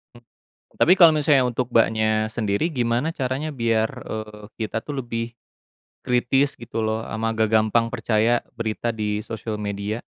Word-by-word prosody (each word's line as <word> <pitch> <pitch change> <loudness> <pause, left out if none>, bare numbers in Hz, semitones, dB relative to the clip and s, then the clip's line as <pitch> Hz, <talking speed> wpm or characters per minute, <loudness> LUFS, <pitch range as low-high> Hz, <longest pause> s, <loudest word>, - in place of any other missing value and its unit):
Hmm 120 - -16 0.5
tapi 180 - +4
kalau 170 -4 +8
misalnya 150 -3 +3
untuk 125 0 -1
Mbaknya 110 -1 +2
sendiri 110 +8 -1
gimana 125 +2 0
caranya 135 +1 -3
biar, 115 -4 +1 0.2
eee, 105 -1 -6
kita 110 0 -3
tuh 135 +3 -5
lebih 115 0 -4 0.7
kritis 130 +3 +1
gitu 115 -1 -4
loh, 110 0 -1
sama 115 0 -2
gak 110 -1 +1
gampang 110 +2 +3
percaya 115 0 +1
berita 115 +1 -2
di 105 -1 -2
sosial 110 0 -5
media? 105 +2 -4
115 Hz, 150 wpm, -23 LUFS, 110-125 Hz, 0.7 s, kalau